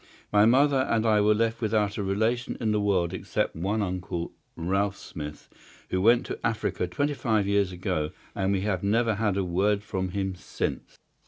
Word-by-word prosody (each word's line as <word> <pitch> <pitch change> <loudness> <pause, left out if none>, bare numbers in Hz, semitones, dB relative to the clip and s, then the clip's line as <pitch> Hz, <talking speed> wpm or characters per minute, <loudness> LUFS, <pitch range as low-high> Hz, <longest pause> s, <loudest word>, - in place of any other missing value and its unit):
My 105 +1 +6
mother 135 +2 +4
and 115 0 +2
I 105 -2 +4
were 105 +1 +4
left 115 +1 0
without 105 -2 +1
a - - -2
relation 110 +5 0
in 110 -3 0
the 105 -1 +1
world 95 -4 +1
except - - -2
one 100 +6 -1
uncle, 90 -2 -3 0.2
Ralph 95 +4 0
Smith, 75 -6 -8 0.4
who 95 - +1
went 120 +4 +5
to - - -5
Africa 110 -5 -1
twenty 145 +12 -1
five 110 -7 +1
years 100 -1 +2
ago, 80 -4 -2 0.2
and 95 0 0
we 95 -1 +1
have 95 -3 -1
never 110 +3 +2
had 105 -2 0
a 100 - +1
word 100 +3 +1
from 95 -3 -3
him 95 0 -2
since. 90 - -4
100 Hz, 185 wpm, -27 LUFS, 95-110 Hz, 0.4 s, My